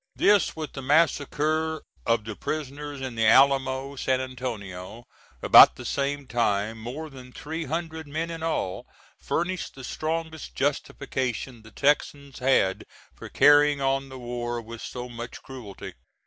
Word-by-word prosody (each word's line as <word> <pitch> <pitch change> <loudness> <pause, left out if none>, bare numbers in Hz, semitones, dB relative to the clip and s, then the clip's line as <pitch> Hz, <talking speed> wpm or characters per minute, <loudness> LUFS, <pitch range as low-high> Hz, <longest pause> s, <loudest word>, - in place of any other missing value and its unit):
This, 205 -4 +3
with 155 -2 -6
the 135 - -6
massacre 155 +2 +1 0.2
of 115 -1 +2
the 110 -1 -5
prisoners 145 0 -5
in 130 -2 -4
the 115 -1 +2
Alamo, 135 +2 +4
San 130 -1 0
Antonio, 115 -5 -6 0.4
about - - +9
the - - -9
same 140 0 -1
time, 110 -2 0
more 130 +8 -6
than 130 -3 -12
three 160 +5 -5
hundred 160 +1 -4
men 160 +3 -3
in 165 -1 -6
all, 160 - -2 0.3
furnished 180 +2 -2
the 135 - -10
strongest 160 +2 -4
justification 130 -3 -2
the 110 - -14
Texans 140 +2 0
had 125 -7 +2 0.3
for - - -10
carrying 145 +1 +5
on 135 0 0
the 130 - -9
war 120 -1 -4
with 115 0 -9
so 125 0 -6
much 120 -1 -8
cruelty. 120 -7 -9
135 Hz, 145 wpm, -26 LUFS, 120-150 Hz, 0.4 s, about